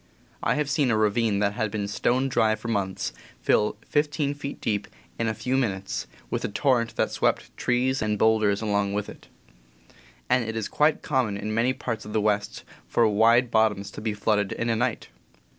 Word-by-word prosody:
I - - +1
have 150 -1 0
seen 140 -1 +1
a 110 - +2
ravine 110 0 +2
that 100 -1 +1
had 110 -1 -1
been 100 -1 -3
stone 125 +6 +1
dry 110 -5 +2
for 115 - -7
months 100 -4 -2 0.3
fill 105 - +2
fifteen 145 -1 0
feet 145 -1 -7
deep, 105 -2 -1 0.3
in 115 - +1
a 110 - -1
few 130 +4 -1
min 120 -7 +1
utes, 95 -9 -5 0.2
with - - -1
a - - 0
torrent 120 0 +1
that - - 0
swept - - -1
trees 130 +2 0
and 105 -1 0
bowlders 110 -1 +3
along 100 -2 0
with 105 0 -2
it; - - -13 1.0
and 125 0 +3
it 115 0 -4
is 110 -2 -2
quite 150 +1 +2
common 125 -8 0
in 105 +2 -4
many 115 +3 +2
parts 115 -3 -4
of 105 - -8
the 110 - +2
West 105 -1 -1 0.2
for 115 - +3
wide 115 +3 +4
bottoms 110 -3 +2
to - - -8
be 110 -1 -2
flooded 105 -1 +1
in 115 - -2
a - - +1
night. 120 0 -1
110 Hz, 200 wpm, -26 LUFS, 105-125 Hz, 1.0 s, wide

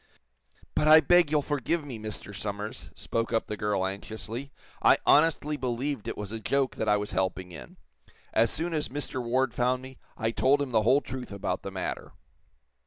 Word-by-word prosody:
"But 150 - +1
I 155 +1 +10
beg 175 +1 +5
you'll 150 -1 +2
forgive 145 +3 -1
me, 125 -6 -6
Mr. 105 -1 -7
Somers," 105 +1 -5
spoke 115 0 -2
up 115 - +1
the 105 - -4
girl, 105 -2 0
anxiously. 110 +7 -6 0.3
"I - - +6
honestly 150 -1 +4
believed 130 0 -2
it - - -4
was 105 -1 -5
a 115 - -4
joke 135 +4 0
that - - 0
I 105 - +5
was 105 0 -4
helping 95 -1 -1
in. - - -10 0.6
As 115 0 +4
soon 165 +6 -3
as 150 -2 0
Mr. 130 -1 -4
Ward 125 +1 +1
found 125 +1 +1
me, 130 0 -11 0.2
I 110 0 0
told 135 +4 +3
him 140 -3 -2
the 110 -2 +4
whole 130 +6 +4
truth 130 -4 -7
about 95 -2 -3
the - - -5
matter." 95 -1 -5
125 Hz, 190 wpm, -28 LUFS, 105-145 Hz, 0.6 s, I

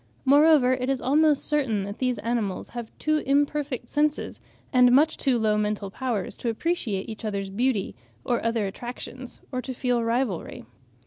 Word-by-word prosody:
Moreover 285 -2 +6
it 255 0 -2
is 270 -1 0
almost 295 +2 +3
certain 265 -9 0
that 200 +1 -7
these 255 -2 0
animals 210 -3 -2
have 240 -2 -6
too 310 0 +1
imperfect 285 -2 0
senses 300 +2 -1 0.3
and 250 -1 +6
much 300 +5 +4
too 265 -4 +1
low 215 -2 +2
mental 210 -2 -2
powers 230 -6 -3
to 240 - -2
appreciate 225 - -2
each 220 0 -8
other's 200 -2 -3
beauty 225 -1 0 0.3
or 240 -2 0
other 230 -2 0
attractions, 245 +4 -7
or 255 -1 -2
to 260 0 -6
feel 245 -1 0
rivalry. 230 -5 -2
245 Hz, 165 wpm, -25 LUFS, 215-275 Hz, 0.3 s, Moreover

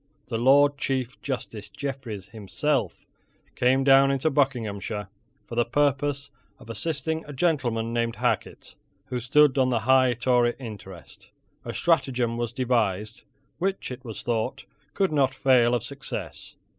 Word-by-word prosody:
The 115 - -1
Lord 140 +3 +5
Chief 130 -2 -2
Justice 110 -6 -5
Jeffreys 130 -8 -6
himself 115 +7 -2 0.5
came 130 +2 +2
down 135 0 +6
into 140 +3 +1
Buckinghamshire, 110 -7 -1 0.4
for - - -11
the 120 0 +2
purpose 140 +2 0 0.3
of 115 - -10
assisting 160 +6 -2
a 145 - -7
gentleman 125 -7 0
named 115 -1 0
Hacket, - - -2 0.3
who 125 0 -3
stood 140 +3 +4
on 130 -1 +3
the 120 -3 0
high 130 +2 +4
Tory 120 0 +2
interest. 105 -8 -11 0.3
A - - -5
stratagem 130 -8 +1
was 120 -1 -2
devised 115 -5 -1 0.3
which, 190 -4 -2
it 125 0 -8
was 115 -4 -7
thought, 120 +1 -2 0.3
could 195 -3 +1
not 135 -3 +2
fail 125 -3 +4
of 120 - -2
success. - - -7
125 Hz, 140 wpm, -25 LUFS, 115-140 Hz, 0.5 s, down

